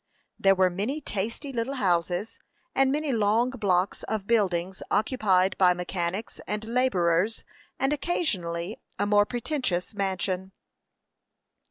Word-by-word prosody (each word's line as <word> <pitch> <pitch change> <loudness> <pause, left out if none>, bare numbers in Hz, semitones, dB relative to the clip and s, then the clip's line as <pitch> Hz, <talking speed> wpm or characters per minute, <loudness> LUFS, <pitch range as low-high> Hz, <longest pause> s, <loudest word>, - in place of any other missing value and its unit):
There 195 0 +5
were 185 -1 +3
many 215 - -2
tasty 230 +3 -4
little 240 +3 -2
houses, 180 - 0 0.3
and 270 0 +3
many 300 0 0
long 225 +2 +2
blocks 195 -6 0
of 215 -2 -3
buildings 190 -5 +1
occupied 195 -5 +2
by 180 -2 +5
mechanics 180 +3 -3
and 210 +1 -3
laborers, 215 -5 +1 0.3
and 270 +2 +1
occasionally 210 - -2 0.2
a 205 - +1
more 205 0 +4
pretentious 240 - -2
mansion. 190 -1 -2
205 Hz, 120 wpm, -27 LUFS, 185-240 Hz, 0.3 s, There